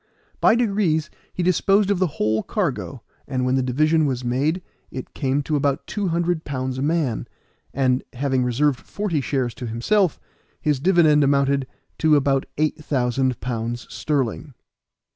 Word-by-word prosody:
By - - +5
degrees 200 -9 +1 0.2
he 180 - -3
disposed 195 +3 +3
of 195 - +1
the 185 - +3
whole 110 +1 +1
cargo, 145 - -3 0.2
and 130 -2 -1
when 130 - +1
the 130 - +2
division 155 +5 +2
was 130 -2 -2
made 145 +9 0 0.3
it 130 - -8
came 140 0 0
to 150 - -1
about 140 -1 0
two 205 -3 -2
hundred 170 -1 0
pounds 130 -2 -3
a - - -2
man, 150 -5 0 0.4
and, 130 -1 +1
having 130 0 0
reserved 130 +2 +1
forty 200 -8 -2
shares 130 -3 -1
to 125 - -6
himself, 170 - +1 0.4
his 150 -3 0
dividend 155 -3 +4
amounted 140 -1 +2 0.3
to 155 -1 +4
about 135 -1 +2
eight 155 +1 0
thousand 130 -2 0
pounds 120 -1 -3
sterling. 140 -1 -2
140 Hz, 155 wpm, -22 LUFS, 130-160 Hz, 0.4 s, By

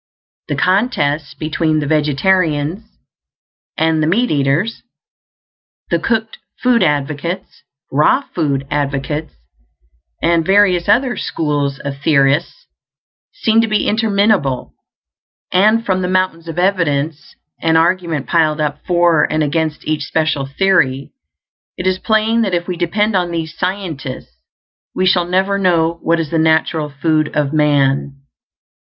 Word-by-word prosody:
The - - -2
contests 160 - 0
between 155 0 -1
the 150 - -2
vegetarians 155 +4 0 0.9
and 160 0 +1
the 155 - +1
meat 235 +9 +1
eaters, 145 +10 0 1.1
the 170 - +2
cooked 220 +4 -2 0.2
food 250 -2 +2
advocates, 150 +3 -2 0.3
raw 150 - +3
food 140 -5 -1
advocates, 145 +2 -2 0.8
and 170 0 +2
various 190 -1 +3
other 245 +4 +3
"schools" 145 -3 -2
of 140 -1 -6
theorists, 140 +2 +1 0.7
seem 225 - +2
to 225 - 0
be 215 -1 0
interminable; 205 - +1 0.8
and 215 +5 +3
from 185 -3 0
the 180 - -1
mountains 185 -3 -1
of 165 0 -6
evidence 160 -5 -1 0.3
and 160 0 +3
argument 165 -3 0
piled 155 -2 +1
up 150 -1 -2
for 175 -3 +3
and 155 0 +1
against 155 +1 -2
each 155 -1 -1
special 155 -4 -1
theory, 140 -4 +1 0.7
it 180 - -5
is 185 0 +1
plain 220 +1 +1
that 195 -5 0
if 175 0 -3
we 180 - -3
depend 200 +5 0
on 180 -2 +1
these 165 -1 -4
scientists 165 - -5 0.6
we 185 - +1
shall 180 -1 +3
never 190 +3 0
know 170 -3 +1
what 170 0 +1
is 160 -3 -3
the 165 - +1
natural 160 -1 +1
food 155 +2 0
of 150 -1 0
man. 140 -2 +1
165 Hz, 130 wpm, -16 LUFS, 150-190 Hz, 1.1 s, raw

